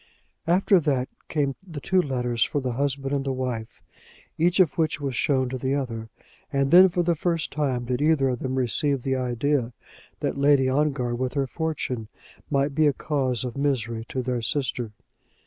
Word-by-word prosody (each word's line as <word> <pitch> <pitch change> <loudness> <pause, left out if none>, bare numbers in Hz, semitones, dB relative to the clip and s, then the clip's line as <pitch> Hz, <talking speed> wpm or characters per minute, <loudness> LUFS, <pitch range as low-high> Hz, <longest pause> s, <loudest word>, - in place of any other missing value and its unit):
After 185 +2 +4
that 135 -5 0 0.2
came 140 -3 0
the 170 -6 -8
two 185 +6 +2
letters 125 -5 0
for 145 - -1
the 130 -2 -2
husband 135 +2 -1
and 140 -1 -1
wife, 120 -4 -4 0.5
each 175 +4 +2
of 175 -6 +4
which 160 -4 0
was 135 -3 -3
shown 130 +1 +1
to 130 0 -4
the 130 +2 0
other; 115 -5 -4 0.4
and 140 0 +1
then 185 +2 +9
for 175 0 0
the 170 0 +2
first 165 0 -1
time 135 -5 -1
did 125 +2 -1
either 150 -3 +3
of 125 -2 -2
them 130 0 -3
receive 130 +1 +1
the 135 -1 0
idea 125 0 0 0.5
that - - -2
Lady 140 -2 +4
Ongar 135 -3 +1
with 125 +1 -2
her 140 -2 +1
fortune 135 -6 -3 0.4
might 140 0 +1
be 155 +1 +3
a 145 - +3
cause 130 -4 -1
of 125 -2 -5
misery 120 -5 -1
to 130 - -2
their 125 -1 -1
sister. 125 -2 -2
135 Hz, 180 wpm, -25 LUFS, 125-150 Hz, 0.5 s, then